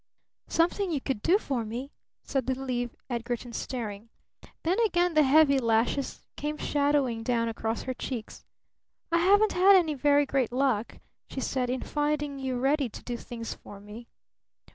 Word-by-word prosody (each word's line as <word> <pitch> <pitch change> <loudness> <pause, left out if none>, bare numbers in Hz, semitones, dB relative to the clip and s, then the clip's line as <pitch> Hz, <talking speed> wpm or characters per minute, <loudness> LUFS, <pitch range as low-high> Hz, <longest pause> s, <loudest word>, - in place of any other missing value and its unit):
"Something 350 +4 +1
you 300 - 0
could 260 -5 -3
do 355 - +4
for 270 - -2
me?" 240 +6 -6 0.3
said 270 -3 -2
little 265 0 -2
Eve 245 -1 -2
Edgarton, 240 0 -4
staring. 225 -3 -5 0.5
Then 360 +6 +1
again 355 -6 +2
the 310 - +5
heavy 280 0 +5
lashes 230 +3 0
came 300 +1 -3
shadowing 285 -6 +1
down 230 -1 0
across 225 0 -3
her 260 - -3
cheeks. 240 - -6 0.7
"I 335 - +4
haven't 405 +4 +4
had 385 +2 +6
any 335 -5 +3
very 290 +1 +3
great 265 -4 0
luck," 250 -4 0 0.3
she - - -5
said, 255 -1 -1
"in 255 0 -1
finding 295 -1 -1
you 260 -2 -2
ready 275 +1 +1
to - - -11
do 245 - -4
things 230 -1 -6
for 200 - -12
me." 210 +4 -11
265 Hz, 165 wpm, -28 LUFS, 235-295 Hz, 0.7 s, had